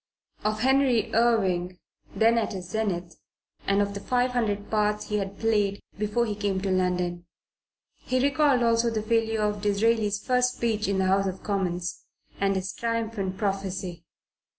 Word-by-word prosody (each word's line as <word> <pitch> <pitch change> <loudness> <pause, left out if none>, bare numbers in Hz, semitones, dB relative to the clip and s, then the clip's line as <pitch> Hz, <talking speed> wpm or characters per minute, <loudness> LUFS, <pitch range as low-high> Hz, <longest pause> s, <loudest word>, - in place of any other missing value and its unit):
of 215 0 -1
Henry 265 -2 +3
Irving 190 -6 +2 0.4
(then 230 +1 +4
at 220 - -2
his 180 -2 -6
zenith) 180 -6 -2 0.5
and 200 +1 +3
the 200 0 -2
five 250 +4 +1
hundred 210 -4 -1
parts 210 -1 0
he 210 - 0
had 195 0 -5
played 205 -3 +1 0.2
before 215 +3 0
he 215 - -2
came 200 -2 -1
to 195 0 -2
London; 180 -1 0 0.7
he 255 0 -1
recalled 280 -1 +3
also 230 0 +3
the 220 -2 -2
failure 225 -1 +1
of 210 -1 -1
Disraeli's 210 0 +2
first 250 0 +2
speech 220 -3 -1
in 200 -1 0
the 190 - +2
House 195 +1 +2
of 190 0 -5
Commons 180 -3 -2 0.4
and 195 0 +2
his 190 0 -3
triumphant 225 -5 -2
prophecy. 190 -4 -3
210 Hz, 155 wpm, -26 LUFS, 190-230 Hz, 0.7 s, then